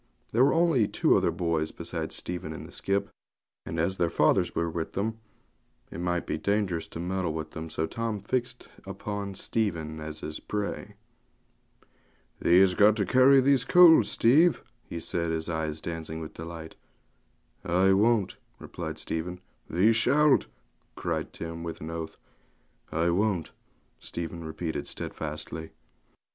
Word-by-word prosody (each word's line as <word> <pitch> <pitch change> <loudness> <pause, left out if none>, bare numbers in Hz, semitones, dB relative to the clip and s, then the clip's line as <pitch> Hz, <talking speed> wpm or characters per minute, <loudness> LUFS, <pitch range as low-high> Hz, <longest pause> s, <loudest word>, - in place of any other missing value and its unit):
There 120 +3 +4
were 140 - +4
only 165 -10 +3
two - - +3
other - - +3
boys 80 -2 -1
besides - - -5
Stephen 85 -3 -5
in - - -8
the - - -11
skip, 100 +1 -1 0.6
and 80 - -3
as 95 +4 0
their 85 - +2
fathers 85 +3 +2
were 85 - 0
with 80 0 -4
them 110 +3 -2 0.7
it - - -7
might 90 0 -1
be - - -3
dangerous 100 -5 0
to - - -8
meddle 90 -1 -2
with 80 -1 -5
them; 80 0 -6
so 80 0 -1
Tim 115 +3 -3
fixed 120 +4 -3 0.2
upon 100 +1 -5
Stephen 85 -9 -2
as 75 0 -7
his 75 - -5
prey. 105 -1 -4 1.4
'Thee 90 +2 +5
has 95 -1 +5
got 105 +3 +5
to 105 -3 0
carry 130 +6 +6
these 135 -1 +3
coals, 175 +2 +7
Steve,' 155 +9 +4 0.3
he 85 - -4
said, 85 0 -2
his 80 0 -2
eyes 80 -2 -2
dancing 80 -1 -5
with 80 -1 -7
delight. 80 0 -8 0.9
'I 95 +2 +3
won't,' 105 0 +2 0.2
replied - - -6
Stephen. 90 +2 -3 0.3
'Thee 95 +7 +4
shalt,' 145 +6 +4 0.5
cried - - -3
Tim, 85 0 -6
with 85 -1 -6
an 80 +2 -6
oath. 80 -1 -6 0.7
'I 85 +2 +1
won't,' 95 -3 0 0.5
Stephen 85 0 -6
repeated 80 +1 -4
stedfastly. 80 +1 -5
90 Hz, 150 wpm, -28 LUFS, 80-105 Hz, 1.4 s, coals